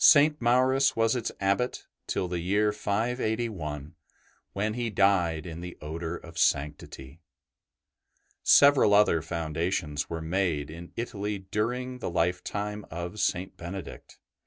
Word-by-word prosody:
BENEDICT 150 0 +4
Maurus 130 +3 +3
was 115 +1 +2
its 120 - -2
Abbot 100 +6 0 0.2
till 90 - -1
the 90 -1 -3
year 100 +5 +2
581, 105 - -2 0.6
when 105 +2 -1
he 120 0 -2
died 95 -6 +2
in 85 -1 -7
the 90 0 -8
odour 80 +2 -4
of 85 -1 -9
sanctity. 70 +1 -1 1.2
Several 140 -8 +6
other 100 -6 +4
foundations 80 -2 -2
were 85 - -3
made 80 -4 -1
m 85 +2 -10
Italy 105 -3 -3
during 120 +6 -3
the - - -3
lifetime 90 +5 -1
of 85 +5 -5
St. 95 -1 -1
Benedict. 85 +1 -8
95 Hz, 125 wpm, -28 LUFS, 85-110 Hz, 1.2 s, Several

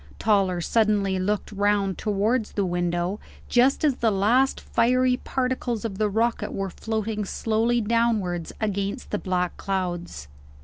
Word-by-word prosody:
Toller 195 -5 +2
suddenly 205 -1 +1
looked 205 +3 -1
round 200 -1 +1
towards 215 +3 0
the 200 - 0
window, 175 +2 -1 0.3
just 260 +5 +3
as 280 -4 +2
the 230 - +2
last 225 +7 +2
fiery 250 +2 +2
particles 250 -4 -2
of 200 -3 -4
the 215 -1 +2
rocket 230 +3 0
were 195 -1 -3
floating 220 0 -3
slowly 225 +4 0
downwards 210 -7 0
against 200 +2 -2
the 210 - -1
black 180 -1 -1
clouds. 175 - -3
210 Hz, 135 wpm, -25 LUFS, 190-230 Hz, 0.3 s, just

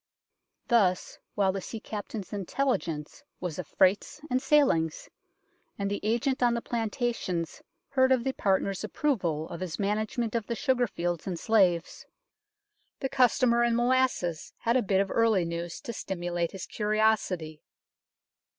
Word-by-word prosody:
Thus, 190 -6 +2 0.2
while 195 -2 +3
the 195 0 -4
sea 225 - -6
captain's 210 -1 -6
intelligence 195 - -2 0.2
was 180 -2 -4
of 175 - -5
freights 195 +9 +2
and 255 +1 +2
sailings, 265 - +2 0.7
and 200 0 -2
the 205 - -1
agent 240 +5 0
on 240 -1 +4
the 235 - -2
planta 235 +1 -1
tions 170 -7 -4 0.3
heard 260 -1 +3
of 255 -2 +3
the 265 +1 -1
partners' 195 -2 0
approval 175 - -1
of 170 - -6
his 180 -3 -4
management 215 +3 -1
of 230 -3 -1
the 235 - -2
sugar 255 -1 +1
fields 175 -3 -3
and 180 -3 -2
slaves, 180 -5 +1 0.9
the 265 - -2
customer 245 -2 +3
in 235 -1 +2
molasses 240 -9 +1
had 230 +1 0
a 255 - +4
bit 195 -3 +2
of 195 - -2
early 220 -6 +3
news 170 0 -4
to 235 -5 -6
stimulate 175 -4 -3
his 195 - -6
curiosity. 210 -7 0
210 Hz, 150 wpm, -28 LUFS, 180-240 Hz, 0.9 s, on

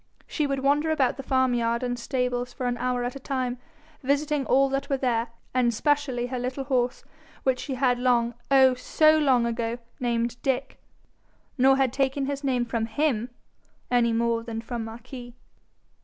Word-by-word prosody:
She 300 -3 -1
would 275 -1 -1
wander 290 +3 +2
about 280 -5 +1
the - - -4
farmyard 245 -3 +1
and 245 -1 -2
stables 250 -1 -2
for 255 - -4
an 245 0 0
hour 250 0 0
at 245 +2 -3
a - - -6
time, 255 -2 -2 0.4
visiting 285 +1 0
all 275 +1 +4
that 275 0 -2
were 275 - +1
there, 240 -3 0 0.3
and 245 -2 +3
specially 265 0 0
her 250 0 -4
little 255 +2 -3
horse, 250 -2 0 0.4
which 260 -1 +1
she 270 - -4
had 250 -1 +2
long, 240 -1 +2 0.2
oh, 265 -2 +6
so 310 +5 +3
long 260 -5 +3
ago! 235 0 -2 0.2
named 235 -1 -1
Dick, 265 -2 -2 0.7
nor 270 0 +5
had 265 -3 +1
taken 270 0 0
his 280 +1 -3
name 250 -3 +1
from 225 -1 -2
him 240 -1 0 0.6
any 240 -1 +3
more 230 0 +1
than 230 -1 -5
from 235 0 -4
Marquis. 240 +2 -9
250 Hz, 170 wpm, -26 LUFS, 240-270 Hz, 0.7 s, oh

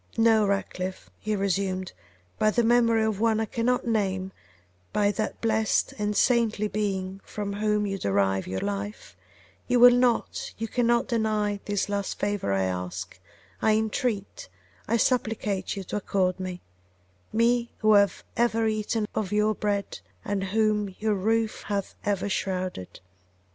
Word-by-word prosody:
'No, 225 -2 +4
Ratcliffe,' 190 -2 -3
he 215 0 -1
resumed, 195 -1 -1 0.5
'by 215 - +4
the 240 +2 +2
memory 230 -1 +4
of 215 -2 -1
one 220 -1 +2
I 220 - 0
cannot 245 +3 0
name, 195 -4 0 0.6
by 205 -1 +2
that 215 +1 -3
blessed 220 -1 +1
and 210 0 -1
saintly 225 -4 +2
being 195 -2 -2
from 205 -1 -5
whom 210 0 +1
you 195 -1 -3
derive 95 - +1
your 95 +1 -3
life, 205 +1 -5 0.5
you 245 -1 +3
will 245 0 +9
not, 245 -1 0
you 225 - -3
cannot 235 0 +1
deny 215 -3 0
this 205 -1 -1
last 200 -1 -2
favour 205 - -1
I 95 -1 +1
ask, 90 +1 -4 0.4
I 215 - +4
entreat, 220 - -2 0.4
I 230 - +2
supplicate 220 -6 0
you 195 - -5
to 190 - -4
accord 190 -2 0
me: 185 -1 -5 0.7
me, 235 +1 +2
who 215 -1 +4
have 200 -1 +3
ever 230 -1 +2
eaten 215 0 -1
of 210 -3 -2
your 210 +1 +2
bread, 205 -1 -2 0.3
and 200 -1 -1
whom 210 -1 +1
your 215 0 0
roof 220 +3 0
hath 200 -2 -2
ever 205 -1 0
shrouded! 185 - -3
210 Hz, 150 wpm, -26 LUFS, 195-225 Hz, 0.7 s, will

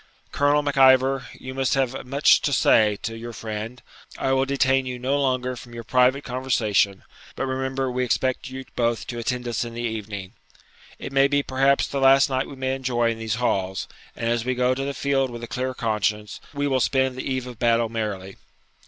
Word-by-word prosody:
Colonel 145 +1 +2
Mac 145 -1 -2
Ivor, 130 0 +5
you 130 - -8
must 135 0 0
have 130 -1 -1
much 140 +3 +4
to 145 - 0
say 110 -4 +4
to 115 - -3
your 115 +1 -7
friend; 110 +4 -6 0.3
I 135 - 0
will 135 0 +2
detain 135 -1 +2
you 125 -1 -4
no 135 +3 0
longer 130 -1 0
from 120 0 -11
your 115 - -6
private 130 +3 +3
conversation; 115 -6 0 0.3
but - - -2
remember 130 0 -2
we 125 +1 -1
expect 130 +1 -1
you 130 0 -7
both 120 -1 0
to 120 - -5
attend 125 +1 -2
us 120 -2 -1
in 115 -1 -7
the 120 - -4
evening. 105 -4 -5 0.6
It - - -7
may 135 0 +5
be 145 0 +1
perhaps 135 +1 +2
the 140 - -3
last 135 +2 +5
night 130 0 0
we 140 - -9
may 130 0 -2
enjoy 120 -3 0
in 115 - -6
these 110 -1 -2
halls, 95 -6 -1 0.3
and 115 - -3
as 120 -1 +1
we 130 +1 -1
go 125 +1 +2
to 135 +1 -3
the 140 0 -3
field 135 -2 +1
with 120 -1 -8
a - - -5
clear 130 +1 -3
conscience, 105 -2 -1
we 145 0 -2
will 135 -2 +1
spend 130 +1 +1
the 130 +1 -4
eve 130 -1 -2
of 125 -3 -10
battle 115 -1 +3
merrily.' 105 -4 -4
125 Hz, 210 wpm, -24 LUFS, 115-135 Hz, 0.6 s, Ivor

